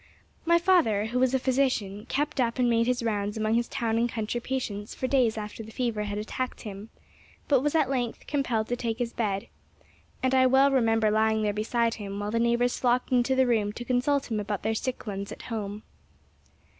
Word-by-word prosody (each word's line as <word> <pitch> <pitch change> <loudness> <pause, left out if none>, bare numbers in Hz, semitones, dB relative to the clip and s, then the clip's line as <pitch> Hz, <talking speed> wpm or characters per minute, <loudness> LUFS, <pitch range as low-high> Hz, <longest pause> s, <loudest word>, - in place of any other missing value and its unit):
My 340 0 +5
father, 335 - +3
who 240 +3 -1
was 260 0 +3
a - - +2
physician, 250 -6 0
kept 290 -1 0
up 235 0 0
and 250 -1 +3
made 230 0 +2
his 250 -1 0
rounds 210 -2 -1
among 215 0 0
his 235 +1 +1
town 225 -1 -1
and 240 +1 +1
country 230 +1 -3
patients 220 -6 -4
for - - -3
days 255 -4 +2
after 210 +1 -6
the 220 0 -10
fever 225 -3 -2
had 205 0 -4
attacked 250 +4 -4
him, 205 0 -8 0.6
but 275 -4 +4
was 295 +3 0
at 310 -4 +3
length 250 -3 -2
compelled 245 -7 -1
to 245 - +1
take 230 -2 -3
his 240 -1 -3
bed, 200 -4 -2 0.8
and 260 0 +2
I 260 0 +5
well 270 +2 +5
remember 225 -4 +3
lying 220 0 +2
there 205 -1 +1
beside 230 +2 0
him 200 -3 -6
while 205 0 -3
the 230 - +1
neighbors 235 +1 +1
flocked 250 0 +1
into 255 +1 +3
the 260 0 +4
room 215 -4 +1
to 240 - -7
consult 255 +2 0
him 215 - 0
about 205 -1 -3
their 220 +1 +1
sick 250 +3 -3
ones 200 -1 -5
at - - -9
home. 210 -2 -5
235 Hz, 210 wpm, -27 LUFS, 215-255 Hz, 0.8 s, My